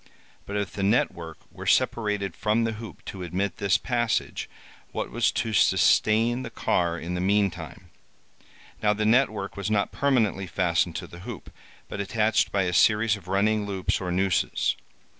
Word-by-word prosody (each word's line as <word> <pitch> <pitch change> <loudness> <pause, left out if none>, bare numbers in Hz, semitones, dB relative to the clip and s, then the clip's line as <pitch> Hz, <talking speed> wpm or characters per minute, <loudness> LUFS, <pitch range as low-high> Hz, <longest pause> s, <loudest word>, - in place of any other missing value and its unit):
But 100 - -3
if 105 -1 -2
the 100 - -5
net 105 +5 +3
work 80 -2 -9
were - - -9
separated 105 -4 +1
from 110 +1 +1
the 115 - 0
hoop 110 -1 -9
to 95 - -7
admit 90 +2 -2
this 100 -1 +2
passage, 120 -2 -1 0.4
what - - -4
was 120 +1 +2
to 115 -2 -2
sustain 115 +4 +3
the 130 - -6
car 85 -1 0
in 85 +2 -5
the 90 - -2
meantime? 95 -5 -1 0.9
Now 105 0 +3
the 105 +1 -1
net 125 +5 +4
work 100 -2 -6
was 100 0 -3
not 105 -2 +1
permanently 115 -9 +1
fastened 85 -1 0
to - - -4
the 85 - -12
hoop, 90 - -9 0.4
but 100 - -4
attached 110 +2 +1
by 100 -1 +1
a 90 -1 -1
series 105 +3 +4
of 95 -4 -13
running 105 +2 +1
loops 95 -2 -1
or 90 -1 -3
nooses. 95 +1 +1
100 Hz, 175 wpm, -26 LUFS, 90-110 Hz, 0.9 s, net